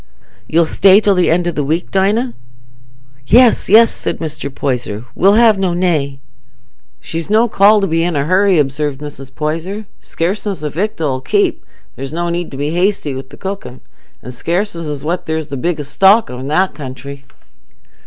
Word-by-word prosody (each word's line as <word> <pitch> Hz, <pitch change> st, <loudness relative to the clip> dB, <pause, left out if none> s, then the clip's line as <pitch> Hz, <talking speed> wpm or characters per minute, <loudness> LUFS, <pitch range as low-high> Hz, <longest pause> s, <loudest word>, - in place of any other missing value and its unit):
You'll 165 Hz, +1 st, +3 dB
stay 195 Hz, +4 st, +5 dB
till 205 Hz, -2 st, +2 dB
the 180 Hz, -2 st, +2 dB
end 175 Hz, +1 st, +1 dB
o' -, -, +1 dB
the 150 Hz, -3 st, -2 dB
week, 160 Hz, +5 st, -2 dB
Dinah?" 210 Hz, +6 st, +1 dB, 0.9 s
"Yes, 245 Hz, 0 st, +4 dB
yes!" 225 Hz, +3 st, +6 dB
said -, -, -3 dB
Mr. 155 Hz, -3 st, -5 dB
Poyser. 125 Hz, -5 st, -3 dB
"We'll 195 Hz, +3 st, +4 dB
have 220 Hz, -3 st, +5 dB
no 185 Hz, -3 st, 0 dB
nay." 155 Hz, -6 st, 0 dB, 0.8 s
"She's 165 Hz, +2 st, -6 dB
no 220 Hz, +3 st, +4 dB
call 210 Hz, 0 st, +4 dB
to -, -, +2 dB
be 165 Hz, -2 st, 0 dB
in 170 Hz, -1 st, -1 dB
a 140 Hz, 0 st, 0 dB
hurry," 185 Hz, +2 st, +3 dB
observed 145 Hz, -1 st, -1 dB
Mrs. 140 Hz, -2 st, -9 dB
Poyser. 165 Hz, +8 st, -3 dB, 0.2 s
"Scarceness 190 Hz, +1 st, -3 dB
o' 150 Hz, -, -1 dB
victual 165 Hz, -2 st, -2 dB
'ull -, -, -10 dB
keep: 395 Hz, -, 0 dB, 0.3 s
there's 135 Hz, 0 st, -7 dB
no 170 Hz, +1 st, -2 dB
need 175 Hz, 0 st, -3 dB
to 135 Hz, -, -9 dB
be 145 Hz, +2 st, -2 dB
hasty 175 Hz, -4 st, 0 dB
wi' 130 Hz, +1 st, -6 dB
the -, -, -13 dB
cooking. 190 Hz, -10 st, -6 dB, 0.4 s
An' 125 Hz, -, -7 dB
scarceness 170 Hz, -, -3 dB
is 145 Hz, -2 st, -5 dB
what 170 Hz, +4 st, -3 dB
there's 160 Hz, -1 st, -3 dB
the 140 Hz, -, -4 dB
biggest 150 Hz, 0 st, -3 dB
stock 200 Hz, -, +4 dB
of 125 Hz, -, -7 dB
i' 130 Hz, -, -6 dB
that 185 Hz, +6 st, +1 dB
country." 140 Hz, 0 st, -9 dB
170 Hz, 185 wpm, -16 LUFS, 145-195 Hz, 0.9 s, yes